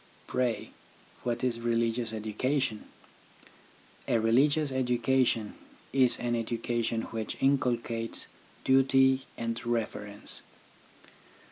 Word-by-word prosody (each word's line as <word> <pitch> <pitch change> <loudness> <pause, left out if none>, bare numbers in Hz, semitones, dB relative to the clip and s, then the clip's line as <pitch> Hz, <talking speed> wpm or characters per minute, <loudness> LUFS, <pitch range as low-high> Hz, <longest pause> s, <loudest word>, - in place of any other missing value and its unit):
Pray, 120 -4 -1 0.5
what 120 0 -2
is 120 -2 +1
religious 115 0 0
education? 110 +2 -1 1.2
A 120 - +3
religious 140 +6 +3
education 125 -3 +1 0.4
is 130 -2 +4
an 120 -1 -1
education 115 0 -1
which 110 -1 -3
inculcates 120 -4 +1 0.4
duty 135 0 +4
and 115 0 -3
reverence. 105 -3 -2
120 Hz, 85 wpm, -29 LUFS, 115-130 Hz, 1.2 s, is